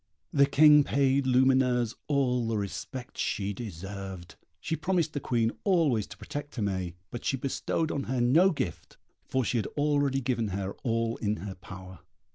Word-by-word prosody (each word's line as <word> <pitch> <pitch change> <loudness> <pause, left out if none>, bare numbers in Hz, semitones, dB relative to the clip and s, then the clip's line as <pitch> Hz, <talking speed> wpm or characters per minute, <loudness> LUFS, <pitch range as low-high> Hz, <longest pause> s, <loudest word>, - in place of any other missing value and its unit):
The 140 -1 +5
King 150 +1 +7
paid 135 -1 +2
Lumineuse 125 -2 +3
all 125 -5 +1
the 115 -1 0
respect 120 +5 -6
she 100 0 -1
deserved. 95 -3 -7 0.3
She 160 - -2
promised 160 0 0
the 145 - -2
Queen 115 -4 +1
always 155 - +2
to 100 - -11
protect 145 +6 -7
Aimée, 95 -6 -2 0.2
but 120 - -6
she 135 - 0
bestowed 140 +4 -1
on 140 - -2
her 130 0 -1
no 145 +11 +5
gift, 120 - -4 0.3
for 130 -2 0
she 120 - 0
had 105 - -2
already 145 -2 +2
given 120 -3 -1
her 95 0 -3
all 115 -2 0
in 105 -1 -1
her 100 - -5
power. 95 0 -11
125 Hz, 165 wpm, -29 LUFS, 100-140 Hz, 0.3 s, King